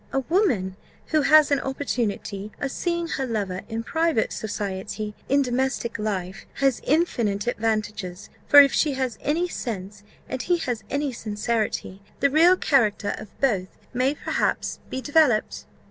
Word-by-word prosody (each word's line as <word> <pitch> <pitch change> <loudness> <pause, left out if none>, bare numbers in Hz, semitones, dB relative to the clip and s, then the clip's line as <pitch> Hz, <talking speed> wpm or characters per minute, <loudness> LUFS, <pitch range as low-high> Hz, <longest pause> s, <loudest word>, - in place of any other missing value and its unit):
A 270 - 0
woman 250 - +1 0.3
who 310 -1 +3
has 300 +1 +6
an 280 - +3
opportunity 220 -7 -3
of 275 - -2
seeing 340 +1 -1
her 270 -5 -2
lover 200 -5 -2
in 225 0 -3
private 320 -3 0
society, 210 0 -4 0.2
in 280 +1 +4
domestic 250 -2 -1
life, 195 -2 -3
has 270 -3 +1
infinite 235 - +1
advantages; 215 -5 -2 0.2
for 290 - +9
if 275 - +4
she 300 -3 +2
has 260 -4 -2
any 330 +5 0
sense, 205 - -5 0.3
and 260 - -3
he 350 0 +1
has 245 -9 -3
any 285 -1 -1
sincerity, 215 -3 -2 0.2
the 280 0 +3
real 340 +5 +6
character 215 - +2
of 215 - -12
both 200 -9 0 0.2
may 255 +4 +1
perhaps - - -1
be 260 - -4
developed." 285 -5 +2
245 Hz, 145 wpm, -24 LUFS, 210-285 Hz, 0.3 s, for